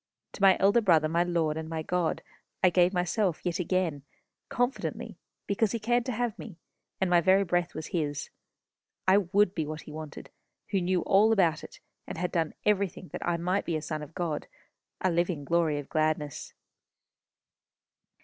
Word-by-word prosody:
To - - -10
my 195 -1 +6
Elder 200 +5 +4
Brother, 165 -7 +4
my 170 +2 +1
Lord, 165 -3 0
and 160 0 -5
my 160 -1 -3
God, 175 -1 -1 0.4
I 185 - +6
gave 180 0 +4
myself 180 0 0
yet 175 -1 -1
again, 180 -5 0 0.5
confidently, 245 +2 -2 0.3
because 205 +2 0
he 230 - -1
cared 240 +3 +1
to - - 0
have 235 -1 -2
me, 200 -8 -9 0.4
and 190 - +1
my 175 -1 +4
very 190 +3 +4
breath 175 -1 -1
was 155 0 -5
his. 145 -4 -2 0.8
I 190 +2 +6
would 200 +1 +2
be 160 -5 -2
what 155 0 -5
he - - -11
wanted, 155 -1 -8 0.4
who 195 -3 +1
knew 180 0 +1
all 205 +3 +4
about 170 -7 +2
it, - - -11 0.3
and - - -6
had 180 +1 -2
done 165 -3 -1
everything 200 -3 0
that - - -6
I 175 -1 0
might 180 +4 0
be 165 - -2
a 155 - -2
son 155 -2 -4
of 150 +1 -10
God 165 -4 -3 0.5
a 185 - +2
living 170 -3 0
glory 165 -2 +1
of 145 - -6
gladness. 155 -2 -1
175 Hz, 180 wpm, -28 LUFS, 160-195 Hz, 0.8 s, my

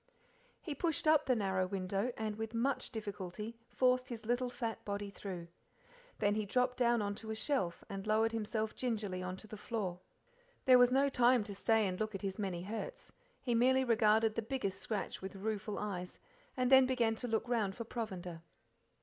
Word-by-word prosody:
He 310 - -3
pushed 315 +1 -1
up 310 -1 +5
the 255 - +4
narrow 190 -3 +1
window, 195 +4 -1
and 215 -1 -2
with 220 +1 -5
much 255 +2 0
difficulty 210 0 -6
forced 255 0 +2
his 230 -3 -6
little 245 +2 +1
fat 240 -2 -4
body 200 0 -3
through. 185 -4 -6 0.7
Then 205 - +2
he 215 0 0
dropped 250 +5 +1
down 235 -3 +3
on 205 0 -1
to 220 +2 -8
a 220 - -2
shelf, 220 - -1
and 195 +1 -6
lowered 220 +1 +3
himself 220 -1 -2
gingerly 210 -7 -2
on 185 0 -4
to 215 - -8
the 215 0 -8
floor. 200 -5 -3 0.7
There 255 -1 +8
was 245 0 +7
no 270 +2 +4
time 250 -3 +4
to 205 - -6
stay 220 +1 +2
to 185 - -2
look 215 +2 -2
at 195 - -6
his 195 +1 -3
many 185 -4 -2
hurts, 225 - -6 0.3
he 245 - 0
merely 260 +3 +4
regarded 220 -2 +4
the 230 - -1
biggest 210 -5 -2
scratch 210 -3 -3
with 190 +1 -6
rueful 210 +1 -3
eyes, 180 -4 -4 0.4
and 255 0 +1
then 265 -1 +8
began 240 -3 +2
to 245 - -3
look 225 +1 0
around 215 -6 0
for 230 - -4
provender. 185 -8 -5
220 Hz, 190 wpm, -35 LUFS, 200-245 Hz, 0.7 s, There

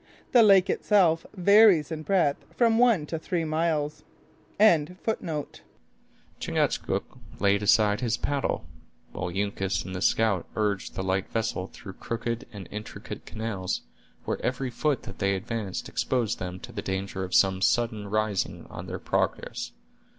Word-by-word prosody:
The 245 - +7
lake 195 -3 +6
itself 175 -6 +3
varies 195 -4 +6
in 155 -1 -3
breadth 165 -5 +1
from 230 -2 +4
one 230 -11 +4
to 160 +1 -4
three 165 0 -2
miles. 155 -1 -1 0.6
Chingachgook 175 -3 +1 1.8
laid 100 +1 +3
aside 105 +1 +4
his 115 -3 0
paddle; 140 -1 -1 0.5
while 90 - -4
Uncas 95 0 -1
and 95 0 -6
the 90 - -4
scout 110 -3 +2
urged 105 -3 -1
the 95 - -2
light 95 0 -1
vessel 110 -5 -2
through 95 -5 -10
crooked 115 +2 -4
and 100 -4 -9
intricate 105 +1 -8
channels, 105 -5 -3 0.4
where - - -3
every 125 0 -1
foot 140 +3 0
that - - -9
they 100 -1 +2
advanced 100 0 -4
exposed 120 -5 -1
them 90 0 -5
to - - -9
the - - -4
danger 95 0 -3
of 90 - -2
some 95 -1 +4
sudden 110 -1 +1
rising 110 -2 -1
on - - -7
their - - -4
progress. - - -2
115 Hz, 145 wpm, -27 LUFS, 100-160 Hz, 1.8 s, The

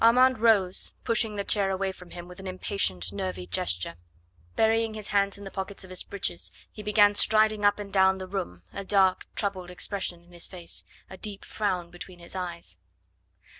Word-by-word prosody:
Armand 250 +1 +6
rose, 205 -5 +3
pushing 225 -2 +1
the 200 - -1
chair 200 -1 +2
away 190 0 0
from 180 -2 -13
him 175 0 -8
with 180 0 -11
an 195 - -7
impatient 100 - -1
nervy 90 -2 -3
gesture. 90 -1 -1 0.6
Burying 225 0 +3
his 215 -2 -6
hands 200 -1 +2
in 200 - -10
the 195 - -7
pockets 190 0 -5
of 185 - -11
his 185 - -2
breeches, 190 -3 -3 0.2
he 215 - -8
began 205 0 +5
striding 215 0 +4
up 205 0 +5
and 200 -2 -7
down 190 -1 +5
the 190 - -5
room, 90 - -4
a 200 - -4
dark, 190 -2 +3
troubled 190 -4 -1
expression 180 -1 -2
in 175 - -21
his 175 -1 -2
face, 175 -3 -5 0.2
a 190 - -10
deep 200 0 -6
frown 185 -5 -1
between 175 +1 -9
his 175 +2 -10
eyes. 170 - -5
190 Hz, 190 wpm, -28 LUFS, 175-205 Hz, 0.6 s, Armand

